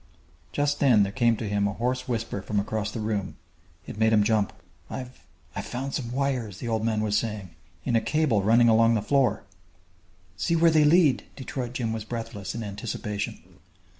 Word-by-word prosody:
Just 145 0 0
then 120 -7 +5
there 100 - -2
came 120 -1 +2
to 110 - -4
him 100 0 +1
a 100 - -2
hoarse 125 +3 -2
whisper 115 -4 -2
from 105 +1 -1
across 105 +1 -2
the 110 - -5
room. 105 -3 -2 0.5
It 105 - -8
made 110 0 +4
him 105 -1 +5
jump. 105 -2 +2 0.4
"I've 130 -1 -8 0.3
I've - - -4
found 135 +2 -4
some 120 -4 -3
wires," 125 -7 -1
the 120 - -6
old 110 -1 0
man 110 -1 +1
was 105 -1 0
saying, 105 -4 -2 0.3
"in 120 - +1
a 115 - +4
cable 150 -9 +1
running 115 +4 +5
along 115 0 +5
the 105 - 0
floor 135 +1 +2 0.5
" 90 +1 -34
"See 170 - +1
where 165 0 +5
they 155 -1 +5
lead!" 155 -3 +4
Detroit 130 -2 -5
Jim 115 -3 -2
was 110 -1 -4
breathless, 110 -4 -5
in 115 - -4
anticipation. 105 -2 -4
115 Hz, 195 wpm, -26 LUFS, 105-125 Hz, 0.5 s, then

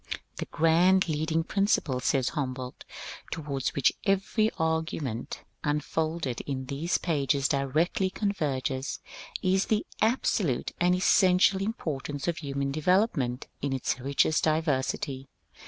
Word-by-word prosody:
^^The - - -5
grand, 175 +4 +4
leading 160 +1 0
principle," 195 -9 +1
says 130 0 +1
Humboldt, 130 -3 -4 0.4
^^ - - -16
towards 140 -5 -3
which 140 - +3
every 195 +3 +2
argument 160 -7 -2 0.2
unfolded 150 -2 -1
in 130 -2 -3
these 145 +6 -1
pages 140 -4 +1
directly 155 +7 +1
converges, 145 - -2 0.4
is 190 +1 +3
the 215 -1 0 0.2
absolute 215 - +1
and 180 +1 +4
essential 185 +1 +4
importance 150 - -3
of 170 -1 0
human 140 -2 -2
development 155 - +1 0.2
in 140 -1 -1
its 130 0 -1
richest 140 +4 +2
diversity." 140 -3 -1
155 Hz, 115 wpm, -28 LUFS, 135-180 Hz, 0.4 s, grand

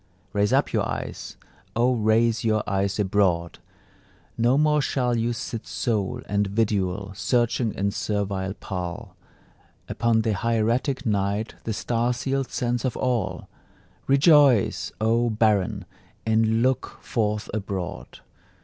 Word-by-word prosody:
Raise 105 0 +1
up - - +2
your - - +2
eyes, - - -6 0.4
O 120 +3 +3
raise 115 +1 +2
your 110 -1 +1
eyes 100 -1 0
abroad! 95 -4 +1 0.8
No 120 +3 +3
more 150 0 +3
shall 125 -3 0
you 115 +1 0
sit 115 -1 -5
sole 105 -5 -1
and 100 0 0
vidual, 100 -2 -1
Searching, 115 +4 +1
in 100 +1 0
servile 100 -2 -2
pall, 90 -3 -6 0.7
Upon 115 -1 +1
the 110 - +1
hieratic 115 +6 0
night 100 0 0
the 110 - -1
star 120 +3 0
sealed 135 +2 -2
sense 120 -1 -1
of 130 - -2
all: 125 -3 -1 0.6
Rejoice, 140 - +4
O 115 +2 +2
barren, 105 -3 +1 0.4
and 110 +1 +2
look 130 0 0
forth 105 -2 -1
abroad! 95 -5 -5
110 Hz, 120 wpm, -24 LUFS, 100-120 Hz, 0.8 s, Rejoice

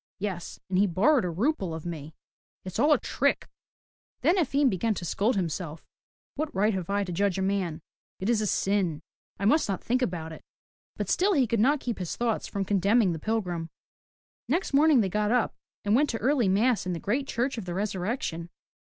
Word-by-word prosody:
Yes, 185 -4 -5
and 185 -1 +1
he 205 - +4
borrowed 220 - +3
a - - -1
rouble 190 - -1
of 160 - -8
me. 155 -2 -6 0.5
It's 185 - -5
all 300 - +4
a 295 - +6
trick!'* - - 0 0.7
Then 345 - +4
Efim 285 -3 +2
began 220 0 0
to 175 - -5
scold 215 +8 +1
himself, 165 -3 -3 0.5
'*What 305 +1 -2
right 210 +3 +2
have 185 -2 -4
I 200 0 +1
to 185 - -5
judge 195 +1 0
a 190 - 0
man? 185 -5 -1 0.4
It 190 - -3
is 230 -2 +2
a 210 - 0
sin. 190 -6 0 0.3
I 200 - -3
must 270 +3 +3
not 195 - -2
think 250 +2 0
about 170 -8 -2
it. 160 - -10 0.5
But - - -2
still 395 +3 +2
he 270 -4 +4
could 230 -1 0
not 280 +7 +3
keep 235 -4 -3
his 180 -3 -3
thoughts 235 -2 -1
from 195 -1 -3
condemning 200 +1 +3
the 165 - -4
pilgrim. 180 -6 -2 0.8
Next 320 +5 0
morning 290 -2 +5
they 200 - +1
got 210 +2 0
up 245 -2 +2 0.3
and 205 - +2
went 290 +3 +3
to 225 - -1
early 250 -3 +2
mass 210 +1 +2
in 180 - -1
the 170 - -4
great 260 +10 -1
Church 245 0 -1
of 205 - -7
the 175 -1 -4
Resurrection. 190 -3 -2
205 Hz, 205 wpm, -27 LUFS, 180-245 Hz, 0.8 s, a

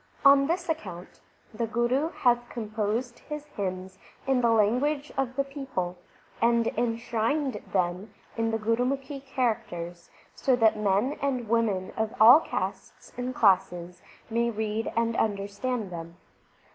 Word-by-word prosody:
On 275 0 +7
this 345 +2 -1
account 190 - -5 0.3
the 230 +1 -2
Guru 240 +7 +1
hath 240 -5 +1
composed 225 +2 -3
his 300 -1 -7
hymns 190 -7 -5 0.3
in 265 -2 +2
the 235 - +3
language 250 +7 +2
of 260 -2 -1
the 275 - +1
people, 270 -11 -4 0.5
and 235 0 +3
enshrined 235 +4 -1
them 185 +2 -1 0.2
in 230 0 0
the 225 - 0
Gurumukhi 260 +5 -1
characters, 175 -10 -3 0.2
so 265 -2 +2
that 225 -3 +4
men 210 +6 +1
and 255 -4 -1
women 210 -5 +1
of 220 -1 -2
all 235 +7 +10
castes - - -5
and 250 0 -4
classes 180 -3 +2 0.3
may 235 +1 +1
read 220 0 -2
and 230 0 +1
understand 205 +1 -2
them. 170 0 -8
230 Hz, 135 wpm, -27 LUFS, 205-260 Hz, 0.5 s, all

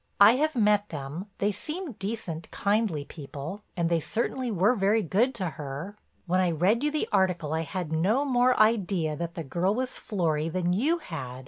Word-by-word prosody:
I 200 +2 +9
have 310 +1 +1
met 210 -3 +3
them; 150 +6 -6
they 205 +1 +1
seem 310 - -5
decent, 195 -7 -5
kindly 200 -8 0
people, 150 +6 -7 0.2
and 170 -1 +1
they 170 0 +2
certainly 240 - -2
were 205 +2 +3
very 210 0 +2
good 230 - +1
to 185 -6 -1
her. 150 +6 -6 0.3
When 185 +1 +1
I 185 -1 +3
read 185 - +2
you 300 - +3
the 300 0 -1
article 175 -5 +1
I 160 - 0
had 165 +1 -4
no 210 - +2
more 250 -1 +3
idea 195 -8 +2
that 170 +2 -5
the 165 - -4
girl 175 +8 0
was 255 +1 -3
Florry 165 -7 -1
than 175 +1 0
you 290 - +2
had. 135 - -7
190 Hz, 190 wpm, -27 LUFS, 165-225 Hz, 0.3 s, I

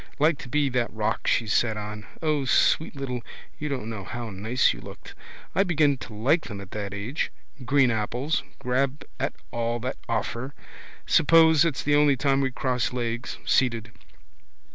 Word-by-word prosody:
Like 155 0 +3
to 125 - -9
be 145 +2 +2
that 125 -2 0
rock 110 -1 -2
she 115 - +3
sat 110 +1 +1
on. 105 0 -6 0.2
O 150 -3 +1
sweet 155 +4 +3
little, 130 -3 -4 0.4
you 150 - -3
don't 130 -6 -3
know 110 -4 -5
how 120 +3 -6
nice 110 +6 +2
you - - -10
looked. - - -11 0.4
I 190 - +3
begin 155 -6 +3
to 110 - -9
like 140 +10 +2
them 100 - -6
at 100 -1 -10
that 100 -2 -4
age. 105 +9 -3 0.3
Green 135 -1 +4
apples. 120 +7 -1 0.2
Grab 130 +3 -1
at - - -1 0.2
all 120 0 -1
that 130 +2 -3
offer. 120 +4 -2 0.5
Suppose 160 -1 +6
it's 155 -5 -1
the 145 - +2
only 145 -2 +5
time 135 0 +2
we 135 - +1
cross 125 -1 -1
legs, 120 -1 -3
seated. 115 -3 +1
125 Hz, 170 wpm, -26 LUFS, 115-145 Hz, 0.5 s, Suppose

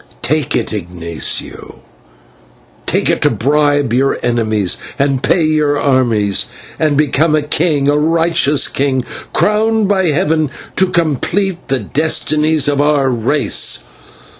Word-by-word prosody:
Take 150 0 0
it, - - -2
Ignatio, 85 -4 -3 1.1
take - - 0
it - - 0
to - - +4
bribe 145 -1 +1
your 135 +2 +1
enemies 110 -5 0 0.2
and 140 -2 0
pay 170 +3 +2
your 150 -2 +1
armies, 120 -8 +1 0.3
and 150 -3 +1
become 150 +1 +2
a 155 - 0
king, 150 -1 0
a 145 - +3
righteous 165 -2 +2
king, 130 -2 -1 0.3
crowned 215 0 +1
by 190 -2 +1
heaven 155 -1 +1 0.3
to 190 - +3
complete 175 +3 -1
the 135 - 0
destinies 155 +1 +1
of 145 -1 +1
our 145 -3 +2
race. 125 +5 0
145 Hz, 125 wpm, -14 LUFS, 130-160 Hz, 1.1 s, to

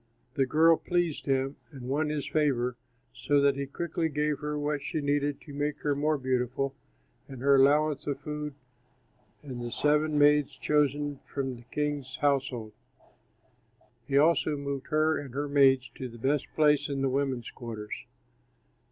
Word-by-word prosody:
The 135 -3 +1
girl 160 +4 +5
pleased 175 -5 -1
him 135 +1 0
and 135 -5 -11
won 150 +3 0
his 150 -2 -2
favor, 125 -5 +1 0.4
so 145 0 +1
that 140 -1 +4
he 140 0 -3
quickly 165 +2 -2
gave 150 -1 -1
her 150 0 -3
what 145 0 -1
she 150 +3 -3
needed 145 0 0
to 145 - -11
make 145 +1 -2
her 145 - +1
more 150 +2 +1
beautiful 130 +1 -1 0.5
and 135 -2 -9
her 140 +2 +4
allowance 145 +2 +3
of 140 -2 -2
food 150 0 -5 0.9
and 130 -4 -6
the 120 - -4
seven 150 +3 +2
maids 145 -1 +4
chosen 145 -1 +1
from 135 -2 -4
the 120 0 -14
king's 145 -3 -2
household. 130 -6 0 1.3
He 140 - +2
also 155 0 +3
moved 140 -1 -4
her 155 +1 +2
and 135 -3 -9
her 145 +1 -1
maids 135 -2 +4
to 130 - -5
the 120 - -12
best 135 +4 0
place 150 -1 +3
in 135 -1 -2
the - - +3
women's 130 -3 -1
quarters. 110 -3 -7
145 Hz, 160 wpm, -29 LUFS, 135-150 Hz, 1.3 s, girl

